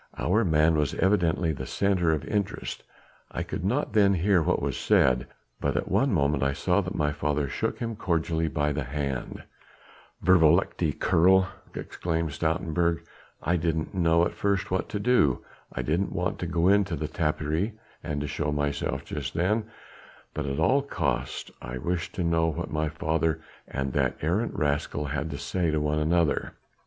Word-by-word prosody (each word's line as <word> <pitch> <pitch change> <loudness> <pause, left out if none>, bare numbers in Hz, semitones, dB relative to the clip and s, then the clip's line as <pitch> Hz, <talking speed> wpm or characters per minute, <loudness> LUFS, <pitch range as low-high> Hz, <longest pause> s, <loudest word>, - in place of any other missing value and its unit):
Our 105 +8 +2
man 80 -2 +3
was 75 -2 0
evidently 90 -4 +2
the 70 - -5
centre 95 -4 +1
of 80 - -1
interest; 105 -2 -2 0.5
I - - -3
could - - -5
not - - 0
then 100 -2 +5
hear 90 +1 +3
what - - +1
was - - -2
said, 65 0 +3 0.3
but - - 0
at - - -2
one 120 +8 +3
moment 75 -5 +2
I 70 0 +2
saw 90 +7 +1
that 90 +1 -5
my 75 -2 +1
father 75 0 -1
shook - - -2
him 115 -1 -3
cordially 80 -4 0
by 75 0 0
the 75 0 -2
hand." 70 -1 -4 0.8
"Vervloekte 85 -2 +4
Keerl!" 95 +2 +4 0.3
exclaimed 80 -2 -2
Stoutenburg. 85 +4 0 0.4
"I 90 +3 +2
didn't 80 -1 -1
know 85 -2 +3
at - - -3
first 100 -2 -1
what 95 - -1
to 105 - -3
do. 100 - +2 0.3
I - - -3
didn't 85 +6 0
want 90 -1 -2
to 90 - -3
go 85 0 +1
into 100 -3 +3
the 75 0 -3
tapperij 80 +5 -1 0.3
and 70 -1 -3
to 75 - -2
show 75 +1 -2
myself 75 -1 -1
just 70 -4 -5
then, 105 +6 +1 0.6
but 75 -2 -3
at 70 +2 -2
all 130 - +4
costs 80 - -2
I - - -5
wished 85 +5 -3
to 90 - -1
know 85 -1 +2
what 80 - -3
my 75 0 0
father 80 0 0 0.3
and 70 -1 -3
that - - +1
arrant 95 +9 0
rascal 75 0 -1
had 75 +3 -2
to 70 - -5
say 90 +3 -1
to 75 0 +1
one 75 +1 0
another. 80 0 +1
80 Hz, 175 wpm, -27 LUFS, 75-90 Hz, 0.8 s, then